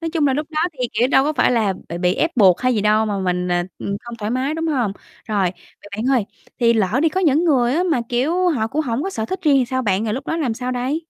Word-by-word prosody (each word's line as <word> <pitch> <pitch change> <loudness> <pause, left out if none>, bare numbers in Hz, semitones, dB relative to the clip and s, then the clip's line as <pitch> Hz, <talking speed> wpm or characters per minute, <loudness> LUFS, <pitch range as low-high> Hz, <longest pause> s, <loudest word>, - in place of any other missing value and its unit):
nói 330 -1 -3
chung 315 -4 +2
là, 270 - +2
lúc 300 +1 -2
đó 310 -1 -1
thì, 250 -4 -3
kiểu, 235 +4 +2
đâu 270 0 +4
có 305 - 0
phải 295 - +2
là 220 -5 +2 0.2
bị 170 - -5
bị 180 +1 +1
ép 325 - 0
buộc 190 -6 +5
hay 255 -1 +2
gì 210 - +1
đâu 215 +1 +2
mà 205 -2 -2
mình, 180 -1 -1
à, 175 0 +1
ừm, 200 0 -3
không 235 -1 -8
thoải 210 0 -3
mái, 260 +5 -1
đúng 325 +1 -2
hông? 250 -10 0 0.4
Rồi, 195 -4 +1 0.3
vậy - - -13
bạn 220 - -3
ơi, 210 - -2 0.4
thì 235 -1 +4
lỡ 220 +2 +1
đi 325 - +4
có 375 +4 -2
những 320 -2 +3
người 255 -7 +3
á, 345 - +2
mà, 260 - +2
kiểu, 320 +10 +1
họ 250 -10 0
cũng 280 +7 -2
hổng 245 0 -2
có 390 - -3
sở 220 - -3
thích 375 +9 -4
riêng 295 -4 +4
thì 260 - +2
sao 260 0 0
bạn, 205 -2 0
rồi 215 -1 -1
lúc 270 +3 -6
đó 325 - -1
làm 270 -9 -1
sao 250 +2 -4
đây? 255 +5 -2
250 Hz, 305 wpm, -20 LUFS, 215-300 Hz, 0.4 s, buộc